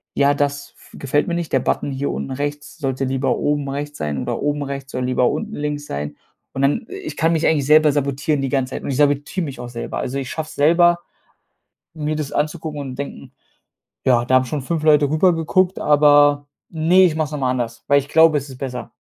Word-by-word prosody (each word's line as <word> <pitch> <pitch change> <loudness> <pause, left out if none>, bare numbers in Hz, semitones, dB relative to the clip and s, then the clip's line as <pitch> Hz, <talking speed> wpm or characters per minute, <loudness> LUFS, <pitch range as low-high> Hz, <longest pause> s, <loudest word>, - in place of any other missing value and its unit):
„Ja, 140 0 +3
das 145 0 -2
f - - -20
gefällt 140 +2 0
mir 170 - -1
nicht. 170 -2 -3
Der 135 - +4
Button 140 - -1
hier 135 +1 -2
unten 135 - -5
rechts 145 +3 -5
sollte 135 -2 -2
lieber 135 +1 0
oben 145 -1 -1
rechts 145 +1 -5
sein 75 -2 -2
oder - - -3
oben 145 0 -1
rechts 135 -1 -6
soll 125 0 -2
lieber 125 -1 +2
unten 220 0 -4
links 145 0 -3
sein.“ 75 +1 -5 0.4
Und 135 - -3
dann 185 - +1
ich 390 -3 -7
kann 165 +1 +2
mich 160 0 0
eigentlich 145 -4 +2
selber 155 0 +6
sabotieren 140 +1 -1
die 135 - -1
ganze 135 -1 -1
Zeit - - -5
und - - -4
ich 130 - -2
sabotiere 145 +4 +1
mich 135 -5 -7
auch 120 - -6
selber. 120 -1 -5
Also, 135 - -3
ich 130 -2 -5
schaffe 160 -1 -4
es - - -11
selber, 170 +4 +4 1.0
mir 155 -1 -2
das 150 -2 -4
anzugucken 150 0 -2
und 130 -2 -7
denken: 140 - -7 0.7
„Ja, 120 -2 +4
da 130 - +2
haben 130 0 +4
schon 140 +3 -3
5 155 +3 -3
Leute 150 -2 +4
rüber 175 +4 +3
geguckt, 180 +3 +1
aber 145 -1 +4 0.2
ne, 170 +4 +4
ich 160 -3 +1
mache 155 - 0
es - - -14
noch 150 - -3
mal 130 -2 0
anders, 120 -2 -4
weil 140 0 +5
ich 140 - -7
glaube, 160 -1 +5
es 140 - -4
ist 130 - -10
besser.“ 125 -3 -5
145 Hz, 230 wpm, -20 LUFS, 135-155 Hz, 1.0 s, selber